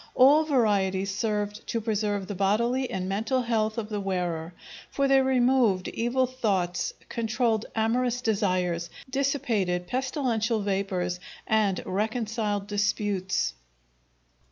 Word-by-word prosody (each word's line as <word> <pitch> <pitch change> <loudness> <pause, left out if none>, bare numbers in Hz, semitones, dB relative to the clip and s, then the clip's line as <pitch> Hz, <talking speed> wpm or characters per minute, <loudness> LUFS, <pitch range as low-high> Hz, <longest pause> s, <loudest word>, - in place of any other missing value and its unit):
All 285 +5 +6
varieties 200 -8 +1
served 210 0 -2
to 230 - -1
preserve 210 -3 -1
the 205 - -5
bodily 235 +7 +1
and 185 -1 -3
mental 225 +7 0
health 220 -2 0
of 220 -2 -3
the 210 -2 -2
wearer, 175 -4 -2 0.4
for 275 0 +1
they 270 0 +5
removed 250 -7 +3
evil 245 +3 +1
thoughts, 200 -9 -1 0.2
controlled 225 -1 0
amorous 240 +2 +1
desires, 185 -7 0 0.2
dissipated 250 -10 0
pestilential 245 - 0
vapors, 190 -3 -1 0.3
and 210 -4 +1
reconciled 215 0 -1
disputes. 205 - 0
215 Hz, 110 wpm, -27 LUFS, 195-245 Hz, 0.4 s, All